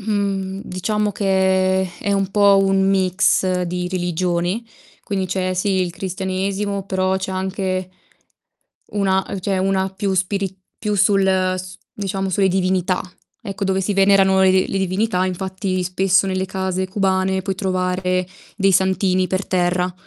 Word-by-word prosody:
Mhmm, 200 Hz, -2 st, -2 dB
diciamo 210 Hz, +3 st, -1 dB
che 190 Hz, -2 st, +1 dB
è 200 Hz, -, -1 dB
un 195 Hz, -1 st, 0 dB
po' 200 Hz, -1 st, +5 dB
un 195 Hz, 0 st, +2 dB
mix 185 Hz, -1 st, +2 dB
di 180 Hz, 0 st, -3 dB
religioni, 180 Hz, +3 st, -1 dB, 0.4 s
quindi 190 Hz, -2 st, -2 dB
c'è, 185 Hz, 0 st, -1 dB
sì, 190 Hz, +1 st, +1 dB
il 180 Hz, -, -2 dB
cristianesimo, 190 Hz, +2 st, -3 dB
però 190 Hz, -1 st, 0 dB
c'è 190 Hz, 0 st, -4 dB
anche 185 Hz, -1 st, -2 dB, 1.0 s
una 190 Hz, -2 st, +1 dB
ehm, 195 Hz, -, -4 dB
c'è 190 Hz, 0 st, -1 dB
una 190 Hz, 0 st, 0 dB
più 195 Hz, 0 st, -2 dB
spiri 190 Hz, +1 st, -1 dB, 0.2 s
più 210 Hz, -1 st, -1 dB
sul 200 Hz, 0 st, +3 dB, 0.3 s
s 185 Hz, 0 st, -8 dB, 0.2 s
diciamo 195 Hz, -1 st, -3 dB
sulle 190 Hz, +1 st, +2 dB
divinità. 185 Hz, -1 st, +1 dB, 0.4 s
Ecco, 195 Hz, 0 st, -4 dB
dove 190 Hz, 0 st, +1 dB
si 205 Hz, +2 st, 0 dB
venerano, 195 Hz, -1 st, +4 dB
ehm, 190 Hz, -, +5 dB, 0.2 s
le 195 Hz, -, -2 dB
divinità, 190 Hz, 0 st, 0 dB
infatti 185 Hz, 0 st, -2 dB
spesso 185 Hz, +1 st, +2 dB
nelle 190 Hz, 0 st, -1 dB
case 190 Hz, 0 st, -2 dB
cubane 190 Hz, -1 st, 0 dB
puoi 195 Hz, 0 st, -2 dB
trovare 185 Hz, -1 st, -1 dB, 0.3 s
dei 195 Hz, -1 st, +3 dB
santini 190 Hz, 0 st, +2 dB
per 185 Hz, +1 st, -2 dB
terra 180 Hz, 0 st, 0 dB
190 Hz, 145 wpm, -20 LUFS, 185-195 Hz, 1.0 s, po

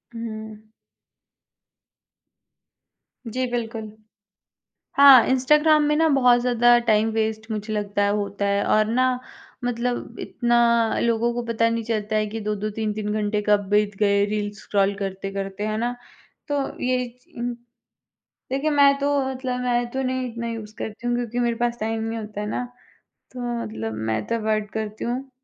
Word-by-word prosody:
हुँ। 220 Hz, -1 st, -7 dB, 2.6 s
जी, 255 Hz, +3 st, -1 dB
बिल्कुल, 225 Hz, -2 st, -4 dB, 1.1 s
हाँ, 275 Hz, -4 st, +9 dB
इंस्टाग्राम 300 Hz, +4 st, +4 dB
में 295 Hz, 0 st, +2 dB
ना 320 Hz, +1 st, +4 dB
बहुत 250 Hz, -4 st, +4 dB
ज़्यादा 240 Hz, 0 st, +4 dB
टाइम 220 Hz, 0 st, +3 dB
वेस्ट 220 Hz, 0 st, -2 dB
मुझे 215 Hz, 0 st, -3 dB
लगता 205 Hz, -1 st, -1 dB
है 200 Hz, -, +2 dB
होता 200 Hz, 0 st, -3 dB
है 200 Hz, 0 st, +1 dB
और 215 Hz, 0 st, +3 dB
ना, 250 Hz, +2 st, +1 dB, 0.4 s
मतलब 245 Hz, -1 st, -2 dB
इतना 235 Hz, -2 st, +2 dB
लोगों 235 Hz, 0 st, +1 dB
को 240 Hz, -, -2 dB
पता 230 Hz, 0 st, +2 dB
नहीं 230 Hz, 0 st, -2 dB
चलता 215 Hz, -1 st, -1 dB
है 215 Hz, 0 st, +1 dB
कि 220 Hz, +2 st, -5 dB
2-2 210 Hz, 0 st, -2 dB
3-3 210 Hz, -1 st, -3 dB
घंटे 210 Hz, 0 st, 0 dB
कब 205 Hz, -1 st, +3 dB
बीत 210 Hz, 0 st, +2 dB
गए 200 Hz, -1 st, +3 dB
रील्स 205 Hz, 0 st, -3 dB
स्क्रॉल 200 Hz, 0 st, +1 dB
करते-करते, 195 Hz, +1 st, -4 dB
है 215 Hz, 0 st, -1 dB
ना? 240 Hz, +2 st, -1 dB, 0.5 s
तो 290 Hz, -1 st, 0 dB, 0.2 s
ये 250 Hz, 0 st, +1 dB, 0.4 s
उ 240 Hz, 0 st, -2 dB, 1.0 s
देखिए, 275 Hz, +4 st, 0 dB
मैं 280 Hz, -1 st, +5 dB
तो 285 Hz, 0 st, +1 dB
मतलब, 255 Hz, -1 st, -3 dB
मैं 240 Hz, -1 st, 0 dB
तो 265 Hz, +2 st, -2 dB
नहीं 255 Hz, -1 st, -1 dB
इतना 235 Hz, 0 st, -5 dB
यूज़ 215 Hz, -2 st, -8 dB
करती 220 Hz, +3 st, -6 dB
हूँ 240 Hz, -, +1 dB
क्योंकि 240 Hz, 0 st, -3 dB
मेरे 235 Hz, -1 st, +1 dB
पास 240 Hz, 0 st, 0 dB
टाइम 220 Hz, +1 st, -2 dB
नहीं 225 Hz, +1 st, -3 dB
होता 210 Hz, -1 st, -6 dB
है 210 Hz, -, -3 dB
ना, 250 Hz, -, -2 dB, 0.7 s
तो 255 Hz, -, -9 dB, 0.2 s
मतलब 110 Hz, -, -5 dB
मैं 110 Hz, -1 st, -1 dB
तो -, -, 0 dB
अवॉइड 215 Hz, -2 st, -1 dB
करती 215 Hz, -1 st, -4 dB
हूँ। 255 Hz, +3 st, -3 dB
225 Hz, 160 wpm, -23 LUFS, 210-245 Hz, 2.6 s, हाँ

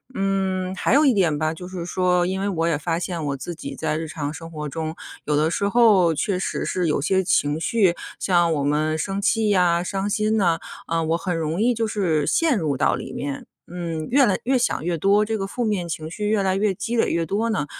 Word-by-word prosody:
嗯， 190 Hz, -1 st, -1 dB
还 210 Hz, -, 0 dB
有 300 Hz, +1 st, +5 dB
一 260 Hz, -, +5 dB
点 170 Hz, -7 st, +2 dB
吧， 155 Hz, +1 st, 0 dB
就 180 Hz, +2 st, -8 dB
是 180 Hz, -2 st, -6 dB
说 180 Hz, -1 st, +1 dB
因 190 Hz, +1 st, -2 dB
为 200 Hz, -, 0 dB
我 165 Hz, -3 st, 0 dB
也 165 Hz, -, +2 dB
发 165 Hz, +2 st, -2 dB
现， 175 Hz, -3 st, -4 dB
我 140 Hz, -1 st, -2 dB
自 175 Hz, +6 st, -6 dB
己 -, -, -7 dB
在 155 Hz, -1 st, -2 dB
日 160 Hz, 0 st, -4 dB
常 150 Hz, -2 st, -4 dB
生 165 Hz, 0 st, -9 dB
活 150 Hz, -1 st, -5 dB
中， 160 Hz, +2 st, -4 dB, 0.3 s
有 150 Hz, -, +1 dB
的 155 Hz, +2 st, +2 dB
时 200 Hz, -, 0 dB
候 205 Hz, -8 st, +5 dB
确 195 Hz, +3 st, 0 dB
实 -, -, -2 dB
是 180 Hz, -2 st, -1 dB
有 150 Hz, -, +1 dB
些 190 Hz, +5 st, +1 dB
情 150 Hz, -3 st, +1 dB
绪， 195 Hz, -6 st, +2 dB, 0.3 s
像 175 Hz, -3 st, +2 dB
我 145 Hz, -2 st, -1 dB
们 155 Hz, +2 st, +1 dB
生 195 Hz, +4 st, -2 dB
气 220 Hz, +1 st, +2 dB
呀、 175 Hz, -3 st, +3 dB
伤 195 Hz, +2 st, -2 dB
心 215 Hz, +1 st, +1 dB
呐， 170 Hz, -5 st, +2 dB, 0.3 s
啊， 165 Hz, 0 st, 0 dB
我 165 Hz, +1 st, +1 dB
很 180 Hz, -1 st, -2 dB
容 160 Hz, +3 st, -2 dB
易 245 Hz, +1 st, +3 dB
就 225 Hz, 0 st, 0 dB
是 170 Hz, -9 st, 0 dB
陷 315 Hz, -8 st, +2 dB
入 150 Hz, -4 st, -1 dB
到 -, -, +2 dB
里 -, -, -7 dB
面， 140 Hz, -1 st, -5 dB, 0.3 s
嗯， 165 Hz, -3 st, -4 dB
越 270 Hz, +1 st, +5 dB
来 190 Hz, -, +1 dB
越 265 Hz, +1 st, +2 dB
想 240 Hz, -, 0 dB
越 175 Hz, -1 st, 0 dB
多， 200 Hz, +4 st, +4 dB
这 220 Hz, +1 st, -2 dB
个 195 Hz, -, -3 dB
负 245 Hz, +4 st, -3 dB
面 190 Hz, -5 st, -1 dB
情 160 Hz, 0 st, -4 dB
绪 210 Hz, +3 st, -2 dB
越 215 Hz, -2 st, +2 dB
来 190 Hz, 0 st, +1 dB
越 205 Hz, -1 st, +1 dB
积 240 Hz, +4 st, -3 dB
累 -, -, +2 dB
越 165 Hz, 0 st, 0 dB
多 220 Hz, +5 st, 0 dB
呢， 190 Hz, -9 st, -1 dB
180 Hz, 260 characters per minute, -23 LUFS, 160-200 Hz, 0.3 s, 有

